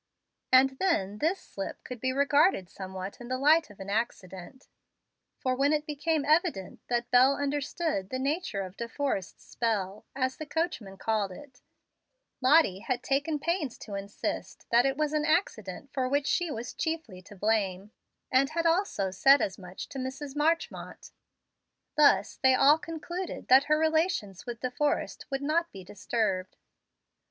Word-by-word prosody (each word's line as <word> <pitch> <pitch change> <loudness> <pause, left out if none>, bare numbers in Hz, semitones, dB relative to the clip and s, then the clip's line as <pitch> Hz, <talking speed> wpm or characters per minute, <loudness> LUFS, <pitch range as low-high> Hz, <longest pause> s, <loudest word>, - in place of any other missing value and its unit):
And 265 +1 +5
then 210 - 0
this 335 - +1
slip 195 - -7
could 250 -2 -7
be 260 +3 0
regarded 280 - +3
somewhat 190 +2 -7
in 240 - -8
the 255 +1 -1
light 305 +3 +4
of 205 - -16
an 195 +1 -6
accident; 200 0 -4 0.7
for 255 -1 -1
when 280 +3 +2
it 300 0 0
became 300 0 -1
evident 310 - +1
that 240 0 -1
Bel 255 +3 +6
understood 285 - -2
the 260 - -2
nature 280 - -1
of 185 0 -9
De 235 - -4
Forrest's 250 -10 -3
"spell," 215 -2 -2
as 260 -1 -1
the 310 - -7
coachman 295 - -3
called 215 -3 -1
it, 260 +6 -13 0.8
Lottie 260 - +5
had 245 +3 -3
taken 285 +3 0
pains 310 -4 -2
to 210 - -9
insist 200 +1 -5
that 240 +3 +5
it 270 0 -1
was 305 -1 0
an 305 -1 +1
accident 275 - -1
for 260 -2 0
which 285 +1 +1
she 350 +3 +1
was 240 -3 -5
chiefly 320 - -4
to 205 - -14
blame; 200 -1 0 0.4
and 270 +1 +4
had 335 +2 -2
also 330 - +1
said 270 +9 +6
as 195 - -2
much 185 0 -8
to 275 - -6
Mrs. 270 +2 -5
Marchmont. 325 +3 -1 0.8
Thus 280 -10 +4
they 260 -1 +4
all 290 +4 +6
concluded 340 +3 -6
that 265 +2 +7
her 305 +1 +3
relations 315 - 0
with 235 -1 -6
De 255 - -2
Forrest 295 +3 -1
would 270 0 -3
not 335 +4 0
be 190 -2 -10
disturbed. 195 -1 -2
260 Hz, 165 wpm, -29 LUFS, 205-300 Hz, 0.8 s, that